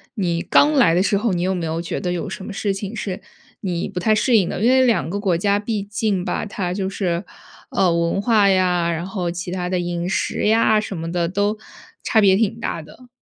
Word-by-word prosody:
你 175 -5 -1
刚 295 - +4
来 240 - +4
的 180 - +3
时 200 - +2
候， 210 0 0
你 175 - -1
有 190 +1 +1
没 175 -3 -3
有 160 +1 -2
觉 170 - -4
得 180 -3 -2
有 180 +3 -3
什 190 0 -7
么 - - -6
事 200 0 -1
情 195 +2 -6
是 195 -4 -4 0.4
你 175 -3 -2
不 185 -2 -5
太 215 +4 +2
适 230 +2 +3
应 185 - +1
的？ - - -4
因 230 - +4
为 260 0 +5
两 230 -9 +1
个 200 - -3
国 185 -5 +1
家 200 +2 +1
毕 210 -1 -3
竟 205 -2 -1
吧， 180 - -2
它 190 -4 -3
就 190 0 -2
是， 180 -3 -2 0.5
呃， 180 -3 +2
文 170 +3 0
化 210 -3 +4
呀， 180 -2 +2
然 165 +1 -3
后 185 -2 -3
其 175 +1 -5
它 180 -1 -3
的 185 0 0
饮 175 0 -3
食 195 - -1
呀 220 0 +4
什 195 -3 -6
么 165 +1 -4
的 170 -1 0
都 205 +3 0 0.5
差 220 - +2
别 195 -3 +5
挺 225 +2 0
大 170 - -3
的。 200 +12 -16
190 Hz, 260 characters per minute, -21 LUFS, 175-210 Hz, 0.5 s, 为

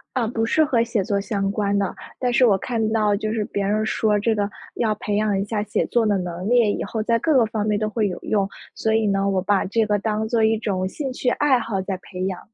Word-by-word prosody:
啊， 235 -3 +1
不 225 0 -1
是 310 +7 +3
和 240 -5 +2
写 230 -5 -1
作 200 -2 0
相 195 -1 -1
关 200 -1 0
的。 195 -2 -1 0.2
但 250 -1 0
是 250 - +4
我 195 -3 +4
看 225 -1 -1
到 210 -2 +2
就 215 +1 -2
是 220 -2 -1
别 200 -1 -3
人 215 +2 +1
说 210 -1 +1
这 220 +2 +1
个， 205 -1 0 0.3
要 220 -2 0
培 205 - -2
养 210 -2 +1
一 - - -1
下 210 0 -2
写 210 - -1
作 235 -2 +1
的 205 -2 +2
能 180 +1 -4
力， 235 -3 +4
以 - - -3
后 220 -2 -3
在 230 +1 +2
各 320 - +1
个 235 -3 +5
方 215 -1 -2
面 210 -1 +1
都 215 - -1
会 215 -1 0
有 180 - -5
用， 200 -2 0 0.3
所 220 - -1
以 220 -1 +2
呢， 195 0 +1
我 190 -1 +1
把 195 0 +2
这 220 +3 +1
个 210 -1 +1
当 215 +1 -1
作 230 -1 +1
一 220 0 +3
种 185 -4 -1
兴 270 +5 -4
趣 250 - -2
爱 270 0 +3
好 220 -4 -2
在 190 0 -3
培 185 0 -6
养。 190 -2 -3
215 Hz, 285 characters per minute, -22 LUFS, 200-225 Hz, 0.3 s, 个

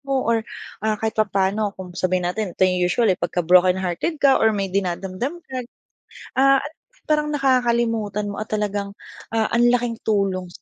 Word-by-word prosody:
mo 275 0 0
or 230 0 +2 0.4
ah, 215 0 0
kahit 220 +1 -2
papaano 200 -1 0
kung 185 -1 -9
sabihin 185 0 -1
natin 200 -2 -4
ito - - -1
'yung 180 -1 +1
usual, 225 +4 +2
eh, - - -5
pagka 175 - -1
broken 180 +2 +5
hearted 190 - -2
ka 280 -2 +4
or 220 -1 +3
may 195 -2 -2
dinadamdam 195 - -3
ka, 265 - -12 0.8
ah, 275 0 +5
alam 295 +3 -8
mo, - - -77 0.3
parang 300 0 +2
nakakalimutan 235 -6 +1
mo 200 - -7
at 215 - -4
talagang, 205 -1 -2 0.4
ah, 220 -1 +1
ang 240 +1 +4
laking 240 -1 +1
tulong. 195 -4 0
210 Hz, 180 wpm, -22 LUFS, 190-240 Hz, 0.8 s, broken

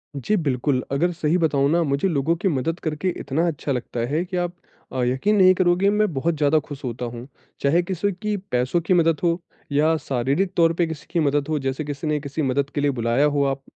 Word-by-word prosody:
जी 140 - 0
बिल्कुल, 135 - 0
अगर 170 +6 +1
सही 165 0 +1
बताऊँ 145 -5 +2
ना 170 +1 +3
मुझे 140 +4 0
लोगों 165 -1 +1
की 190 +4 -1
मदद 165 +1 -1
करके 155 +3 -1
इतना 160 +5 -1
अच्छा 150 -3 -3
लगता 125 -2 -3
है 155 +4 0
कि 180 0 -4
आप 175 0 -1 0.4
अ, 130 -1 0
यक़ीन 130 +12 +1
नहीं 185 -1 +7
करोगे 180 +1 +3
मैं 210 -3 +1
बहुत 160 +5 0
ज़्यादा 150 +1 +3
खुश 145 -1 -10
होता 125 -1 -4
हूँ। 120 +1 -7 0.3
चाहे 150 +5 +3
किसी 190 +3 -1
की 210 +3 -3 0.2
पैसों 125 +7 +1
की 170 +3 +1
मदद 165 -3 +3
हो 170 0 +2 0.3
या 155 +3 +3
शारीरिक 140 +7 -1
तौर 165 -1 +4
पे 170 0 +1
किसी 160 -2 -7
की 170 - +1
मदद 145 -2 +1
हो, 155 -1 0
जैसे 135 +2 -2
किसी 145 +1 -5
ने 150 0 +1
किसी 140 +2 -4
मदद 140 0 0
के 145 - 0
लिए 145 0 +2
बुलाया 120 +2 +1
हो, 145 -1 +2
आप 135 0 -1
150 Hz, 225 wpm, -23 LUFS, 140-175 Hz, 0.4 s, नहीं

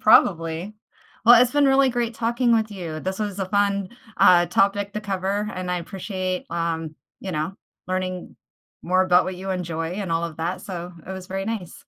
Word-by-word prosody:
Probably. 170 -2 +3 0.5
Well, 240 +1 +9
it's 250 +1 +3
been 290 -1 +4
really 270 0 +5
great 240 -1 -1
talking 235 +1 +1
with 220 -1 +1
you. 170 -6 -6
This 190 +3 -3
was 205 -2 -3
a 190 - -1
fun, 200 -1 +1 0.3
uh, 175 -1 +6
topic 200 +3 +1
to 210 - -2
cover, 200 +1 -2
and 180 0 -4
I 180 - 0
appreciate, 185 0 -4
um, 165 -2 -2 0.3
you 190 -2 -5
know, 155 +5 -2 0.3
learning 185 -1 -3 0.5
more 185 +2 +3
about 180 -1 +4
what 185 -1 -4
you 190 +1 -5
enjoy 165 -3 -3
and 190 -3 -3
all 165 +1 +1
of 165 -2 -6
that, 170 +3 -2
so, 180 -2 -6
it 190 - -5
was 190 -1 -7
very 195 +1 -3
nice. 215 -7 -4
185 Hz, 190 wpm, -23 LUFS, 175-205 Hz, 0.5 s, Well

